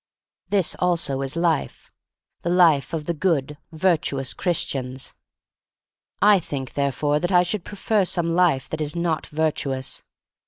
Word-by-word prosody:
This 195 -4 +2
also 165 -7 0
is 135 +1 -3
life 170 -3 -1 0.3
— - - -57
the 170 - -2
life 170 -6 +4
of 160 -2 -3
the 170 - -1
good, 150 -4 0
virtuous 155 -5 0
Christians. 135 -7 -2 1.1
I 205 -1 +7
think, 135 -6 -6
therefore, 145 +1 0
that 175 +4 -1
I 180 -1 +6
should 180 +1 -2
pre 205 - -9
fer 210 0 +2
some 170 -2 -1
life 170 -7 +2
that 155 - -4
is 150 +2 -2
not 170 -2 -1
virtuous. 145 -4 -2
160 Hz, 150 wpm, -23 LUFS, 140-175 Hz, 1.1 s, I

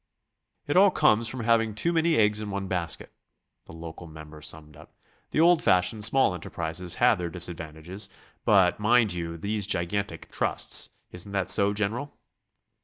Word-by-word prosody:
"It 145 - -2
all 195 +2 +7
comes 115 - +2
from 130 +2 -4
having 115 -2 +1
too 170 +11 0
many 165 0 +2
eggs 105 -1 +2
in 105 -1 -5
one 100 -1 -4
basket," 90 -3 -3 0.6
the - - -12
local 80 +1 -9
member 80 -1 -12
summed 75 0 -6
up. 80 +2 -17 0.3
"The - - -1
old 170 +1 +5
fashioned 90 +4 +2
small 115 -3 +4
enterprises 85 0 -4
had - - +3
their 85 -1 -3
disadvantages, 85 +2 -4 0.3
but 95 -3 +3
mind 110 -1 +3
you 85 -1 -5
these 100 +3 -3
gigantic 85 -1 -3
trusts.... - - 0 0.2
Isn't 90 +3 -8
that 95 -2 +1
so, 100 -1 +3
General?" 110 +8 -3
100 Hz, 160 wpm, -26 LUFS, 85-110 Hz, 0.6 s, all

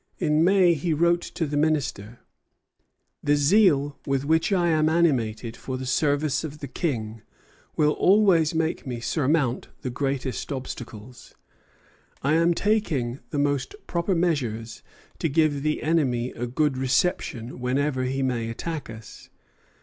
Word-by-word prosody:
In 155 -2 +2
May 185 -1 +5
he 160 +1 -1
wrote 170 +2 +3
to 165 - -4
the 145 0 -4
Minister: 140 -8 -1 1.0
"The 145 0 +2
zeal 145 -2 +3
with 135 0 0
which 160 +5 +2
I 175 -3 +2
am 155 -1 +3
animated 120 -9 +1
for 130 +1 -5
the 130 - -6
service 145 +3 +1
of 150 -1 -6
the 145 - -7
King 115 -6 -3 0.5
will 150 -1 +3
always 180 -4 +3
make 160 -2 -1
me 120 -2 -4
surmount 140 0 0 0.2
the 125 - -3
greatest 135 0 -3
obstacles. 120 -3 -8 0.9
I 140 +3 +2
am 170 +1 +3
taking 155 - 0
the 150 - -4
most 145 - 0
proper 175 +2 -1
measures 125 -10 -1 0.4
to 165 - 0
give 145 -1 +2
the 155 +1 -1
enemy 130 -7 +1
a 120 +1 -5
good 135 +1 0
reception 130 -3 -1
whenever 130 +1 0
he 135 +1 -1
may 120 -3 -1
attack 150 +5 -5
us. 110 -1 -11
145 Hz, 140 wpm, -25 LUFS, 125-160 Hz, 1.0 s, May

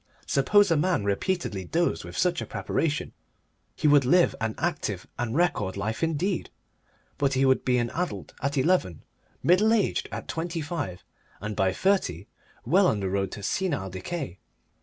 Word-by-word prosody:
Suppose 200 +8 +4
a 165 - +4
man 180 - +1
repeatedly 100 - -1
dosed 170 - 0
with - - -8
such 180 -1 +1
a - - -5
preparation: 155 -2 -2 0.6
he 155 - +1
would 145 -1 +6
live 170 +8 +4
an 110 -1 -1
active - - -2
and 120 -1 -2
record 145 - +1
life 110 +3 -3
indeed, 165 +3 -1 0.7
but 140 -1 +2
he 135 +1 +3
would 130 0 +3
be 125 -1 +2
an 120 -1 0
adult 180 +1 -4
at 140 +2 -1
eleven, 130 - +1 0.4
middle 195 +6 +4
aged 225 -3 +1
at - - -6
twenty 165 +1 -3
five, 145 - -4 0.4
and 105 +2 -4
by 95 -2 +2
thirty 100 - 0 0.4
well 185 +3 +4
on 105 - +1
the 95 -2 -2
road 95 0 0
to 105 - -7
senile 140 - -1
decay. 95 - -5
140 Hz, 165 wpm, -27 LUFS, -, 0.7 s, would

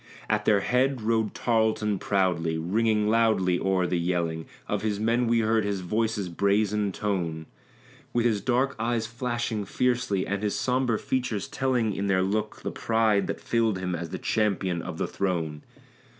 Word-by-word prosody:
At 105 0 0
their 105 -2 +4
head 125 +2 +1
rode 110 -1 0
Tarleton 110 -3 +1
proudly; 90 -5 +1
ringing 105 +5 +1
loudly 110 -5 +3
o'er 95 -1 +1
the 85 0 0
yelling 85 -2 -1 0.2
Of - - -1
his 105 -2 -1
men 115 +2 +1
we 115 0 +3
heard 110 0 +2
his 100 -2 -2
voice's 105 +1 -1
brazen 100 +3 +1
tone; 85 -6 -2 0.7
With 120 -1 +1
his 110 -4 +2
dark 130 +1 +1
eyes 115 0 0
flashing 120 -2 -2
fiercely, 120 -3 0
and 100 0 -2
his 105 -1 -1
sombre 125 -3 +1
features 125 -6 -2
telling 125 -5 0
In 100 +1 -2
their 95 -1 +2
look 105 +2 -2
the - - -2
pride 110 -3 +1
that - - -3
filled 115 -4 +1
him 90 -1 -3
as 85 -1 -4
the - - -4
champion 95 -5 0
of - - -6
the - - -1
throne. 80 -6 -2
105 Hz, 165 wpm, -27 LUFS, 95-115 Hz, 0.7 s, their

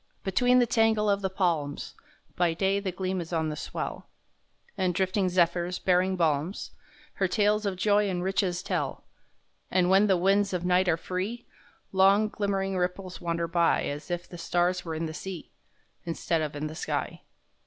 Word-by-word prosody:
Between 245 +6 +3
the 245 - +5
tangle 225 -2 +2
of 200 0 0
the 190 - -1
palms, 170 -7 -1 0.4
By 175 -2 +1
day 195 +3 +1
the 195 -2 -3
gleam 185 0 -2
is 170 - -8
on 160 -2 0
the 150 - -4
swell, - - -5 0.7
And 185 -3 0
drifting 190 0 +1
zephyrs, 175 0 +1
bearing 185 +1 +2
balms, 165 +1 -1 0.4
Her 190 - 0
tales 210 +1 +2
of 195 - -1
joy 205 +2 +2
and 180 -1 -2
riches 185 -1 0
tell, - - -2 0.7
And 185 -1 +2
when 195 +2 +5
the 190 -2 +4
winds 195 +2 +2
of 180 -1 -2
night 180 +1 +3
are 165 - +3
free 190 +8 -4 0.5
Long, 195 +3 +4
glimmering 195 -2 -1
ripples 180 +1 -3
wander 170 0 -1
by 170 0 +2
As 145 +4 -5
if 175 0 -3
the 175 - -10
stars 175 +1 0
where 165 -2 -4
in 165 +1 -2
the 160 - -5
sea, 185 0 -7 0.5
Instead 165 -1 -1
of 150 -1 -3
in 145 +1 -3
the 155 - -5
sky. - - -3
185 Hz, 175 wpm, -28 LUFS, 170-195 Hz, 0.7 s, the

